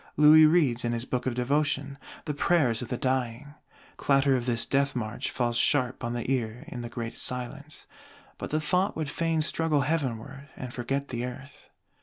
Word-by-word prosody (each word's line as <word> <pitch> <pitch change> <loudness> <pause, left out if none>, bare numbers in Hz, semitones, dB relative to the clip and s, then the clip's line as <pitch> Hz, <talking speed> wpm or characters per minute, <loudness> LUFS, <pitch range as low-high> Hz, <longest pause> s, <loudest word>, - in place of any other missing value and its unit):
Louis 155 +1 +8
reads, 150 -8 +3
in 120 0 -1
his 120 +1 -2
Book 125 0 -2
of 125 - -1
Devotion, 140 +2 0 0.3
the 150 - -2
Prayers 145 -6 +2
of 125 - -5
the 125 - -3
Dying: 130 +2 -2 0.4
clatter 135 -1 +3
of 125 -1 -2
this 115 -2 +2
death 140 0 +1
march 110 -3 -3
falls 120 -2 -1
sharp 130 -1 +1
on 120 0 -2
the 120 - -4
ear 120 -3 -2
in 125 - -6
the 120 - -6
great 115 -1 -5
silence; 140 +4 -3 0.5
but - - -5
the 155 - 0
thought 180 +5 0
would 155 -3 -3
fain 165 -1 0
struggle 155 -1 +1
heavenward, 135 -1 -3
and 125 -2 -7
forget 135 +3 -3
the 120 -1 -3
Earth. 130 +3 -9
135 Hz, 185 wpm, -27 LUFS, 120-150 Hz, 0.5 s, Louis